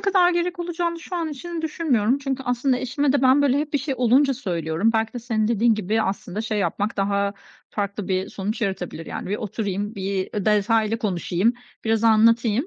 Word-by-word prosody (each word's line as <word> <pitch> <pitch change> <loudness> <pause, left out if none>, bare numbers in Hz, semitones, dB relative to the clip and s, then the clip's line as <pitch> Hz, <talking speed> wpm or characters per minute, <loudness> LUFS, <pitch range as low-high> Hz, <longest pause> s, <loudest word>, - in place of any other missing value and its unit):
kadar 375 -3 +4
gerek 350 +1 -1
olacağını 340 -1 -2
şu 360 +2 -5
an 330 -2 -1
için 325 +3 -6
düşünmüyorum. 275 -7 +1
Çünkü 270 -1 -3
aslında 250 +1 +1
eşime 270 +2 0
de 285 - +1
ben, 265 +2 +5
böyle, 280 0 +3
hep 295 0 -3
bir 285 - +2
şey 270 +1 -2
olunca 260 +3 +4
söylüyorum. 175 - 0
Belki 220 0 0
de 245 - -5
senin 225 -2 -1
dediğin 230 0 +3
gibi, 215 +2 0
aslında 195 0 -3
şey 220 -1 -2
yapmak 200 +3 -1
daha 200 0 0 0.4
farklı 200 -1 -3
bir 190 +1 0
sonuç 210 +5 -4
yaratabilir. 185 -5 -3
Yani - - -5
bir 205 - 0
oturayım, 205 0 -3
bir, 195 -1 -2
ııı, 205 - -2
detaylı 215 +1 +2
konuşayım, 190 0 0 0.3
biraz 225 0 +1
anlatayım. 230 +3 +4
225 Hz, 190 wpm, -23 LUFS, 200-275 Hz, 0.4 s, ben